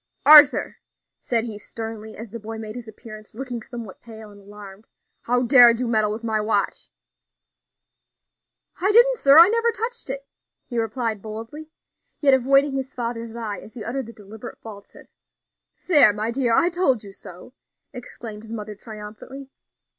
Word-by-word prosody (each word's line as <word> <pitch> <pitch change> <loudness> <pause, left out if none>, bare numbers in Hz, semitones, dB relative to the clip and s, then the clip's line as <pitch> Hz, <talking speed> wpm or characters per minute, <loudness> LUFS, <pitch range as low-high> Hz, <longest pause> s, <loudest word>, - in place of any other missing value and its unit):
"Arthur," 300 -1 +7 0.4
said 230 -2 0
he 220 -3 -7
sternly, 220 0 -8
as 225 -1 -9
the 230 - -7
boy 225 +1 -8
made 215 -1 -7
his 240 -1 -9
appearance, 215 -1 -13
looking 250 -1 -6
somewhat 230 -4 -10
pale 220 -2 -12
and 205 0 -16
alarmed, 200 0 -13 0.4
"how 245 +1 +1
dared 240 -2 +6
you 250 - -2
meddle 215 -2 +1
with 220 +2 -6
my 220 -2 -1
watch?" 210 -2 -2 1.9
"I 390 +3 +1
didn't, 485 +3 +5
sir; 280 -6 +5
I 335 +2 +10
never 465 +2 +1
touched 465 - -5
it," 275 +1 -5 0.4
he 240 -2 -4
replied 225 -1 -3
boldly, 225 +9 -9 0.5
yet 280 -3 +4
avoiding 275 +2 +3
his 265 -1 -5
father's 230 -1 -5
eye 215 -5 -5
as 220 - -15
he 225 - -7
uttered 250 +2 -4
the 230 - -11
deliberate 215 +3 -12
falsehood. 205 -2 -13 0.8
"There, 300 - +6
my 215 +2 -3
dear, 245 -1 -1
I 345 - +3
told 275 - 0
you 200 - -11
so," 180 +4 -13 0.4
exclaimed 230 -4 -9
his 225 +1 -10
mother, 210 -1 -6
triumphantly. 215 +6 -11
230 Hz, 160 wpm, -22 LUFS, 215-265 Hz, 1.9 s, I